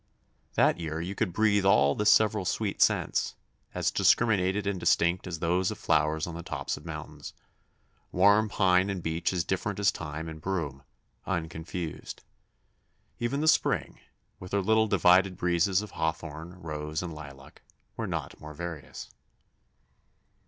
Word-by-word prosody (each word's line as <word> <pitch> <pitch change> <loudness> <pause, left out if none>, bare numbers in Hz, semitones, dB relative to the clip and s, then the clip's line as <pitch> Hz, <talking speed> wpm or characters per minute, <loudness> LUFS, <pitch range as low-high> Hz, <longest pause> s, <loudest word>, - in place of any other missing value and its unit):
That - - +3
year 80 -1 -4
you 90 +4 -4
could 100 -2 -1
breathe 105 +1 +2
all 70 -7 +4
the 105 +5 -1
several 105 -2 +4
sweet 100 +2 -2
scents, - - +2 0.4
as - - 0
discriminated 100 -2 +2
and 100 -2 -1
distinct 85 +2 +2
as 90 -3 -4
those 90 +3 +1
of 110 - -5
flowers 80 -2 +1
on 85 - -7
the 85 - -6
tops - - -4
of - - -12
mountains - - -8 0.8
warm 100 +4 +4
pine 95 -1 +3
and 95 -3 -4
beech 80 +1 -1
as 90 -3 0
different 95 +3 -2
as 100 - +4
thyme 80 0 -6
and 80 -1 -8
broom, 80 -7 -3 0.5
unconfused. 80 0 -5 1.0
Even 120 +5 -1
the 155 - 0
Spring, 160 - +2 0.4
with 90 +1 -10
her 100 - +2
little 110 +3 +3
divided 95 -1 +4
breezes 90 +3 +1
of 105 - -9
hawthorn, 80 +1 -4
rose, 75 0 -4
and 85 -2 -5
lilac, 70 -3 -12 0.3
was - - -4
not - - -5
more 75 0 -9
various. 85 -1 -7
90 Hz, 150 wpm, -28 LUFS, 80-100 Hz, 1.0 s, all